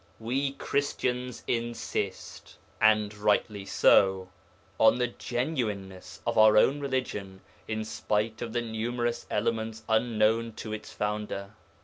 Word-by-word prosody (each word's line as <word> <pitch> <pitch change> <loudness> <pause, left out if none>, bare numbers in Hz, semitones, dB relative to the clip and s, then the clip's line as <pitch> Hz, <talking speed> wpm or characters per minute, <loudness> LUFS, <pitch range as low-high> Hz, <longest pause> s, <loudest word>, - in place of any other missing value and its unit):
We 135 +5 -1
Christians 125 -4 -2
insist 120 0 -4 0.2
and 110 -1 +4
rightly 105 -1 0
so 95 -1 +4 0.5
on - - +6
the 125 - +2
'genuineness' 105 - -4
of 115 -1 +1
our 110 0 +7
own 135 +6 +4
religion 115 -9 -3 0.3
in 110 0 -2
spite 110 +1 -1
of 120 -2 -4
the 120 +1 -1
numerous 120 +1 -2
elements 110 0 -1
unknown 110 0 +2
to 110 0 -6
its 110 0 -7
'Founder.' 105 -1 -3
110 Hz, 115 wpm, -28 LUFS, 105-120 Hz, 0.5 s, our